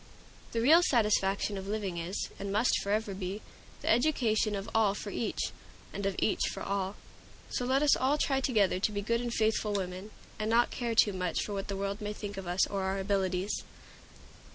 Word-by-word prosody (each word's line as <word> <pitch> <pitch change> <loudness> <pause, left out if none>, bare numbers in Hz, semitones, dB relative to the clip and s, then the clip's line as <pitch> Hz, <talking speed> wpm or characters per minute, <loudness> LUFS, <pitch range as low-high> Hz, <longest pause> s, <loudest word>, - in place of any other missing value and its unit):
The 230 - 0
real 315 +8 +7
satisfaction 210 - +2
of 190 - -8
living 200 -4 -2
is, 175 +4 -3
and 200 0 -4
must 215 +5 +2
forever 205 0 -1
be, 190 +2 -5 0.4
the - - -5
education 225 -5 +2
of 195 0 -4
all 215 -3 +3
for 205 - -6
each, 230 - -2 0.4
and 200 -1 -2
of 195 - -1
each 210 - +1
for - - -6
all. 195 0 -2 0.6
So 250 - -1
let 265 +3 +2
us 295 - +6
all 275 +3 +2
try 270 -2 +1
together 210 -8 +2
to 210 - +1
be 205 -1 -3
good 235 +3 0
and 240 -1 -3
faithful 215 -2 +1
women, 185 +1 -3 0.3
and 215 0 -1
not 235 +2 +3
care 235 -2 -2
too 210 -2 +5
much 180 -2 -1
for 205 - -5
what 195 -1 -3
the 195 - -3
world 200 +2 -3
may 210 0 -3
think 205 -1 -6
of 190 -2 -6
us 180 +2 +2
or 200 -1 -3
of 190 - -1
our 190 +1 -1
abilities! 190 0 0
205 Hz, 205 wpm, -31 LUFS, 195-225 Hz, 0.6 s, real